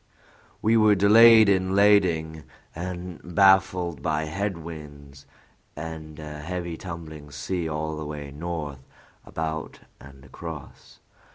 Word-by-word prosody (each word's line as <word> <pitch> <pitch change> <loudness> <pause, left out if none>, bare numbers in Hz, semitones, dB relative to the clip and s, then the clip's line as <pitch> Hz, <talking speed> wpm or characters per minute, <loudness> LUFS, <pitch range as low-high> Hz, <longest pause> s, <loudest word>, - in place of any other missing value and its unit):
"We 115 +1 +4
were 110 -1 +5
delayed 110 +2 +7
in 95 -1 +2
lading, 85 -7 +3 0.3
and 90 0 -6 0.2
baffled 95 -6 +3
by 75 +1 -1
head 95 +4 -3
winds 75 -4 -11 0.5
and 80 -1 -8
a 75 -1 -8
heavy 85 +1 -5
tumbling 80 -4 -9
sea 85 +2 -3
all 80 0 -3
the 75 - -5
way 75 -2 -7
north 75 -2 -5 0.5
about 80 -1 -5 0.2
and 70 -1 -15
across. 80 -4 -10
80 Hz, 115 wpm, -25 LUFS, 75-95 Hz, 0.5 s, delayed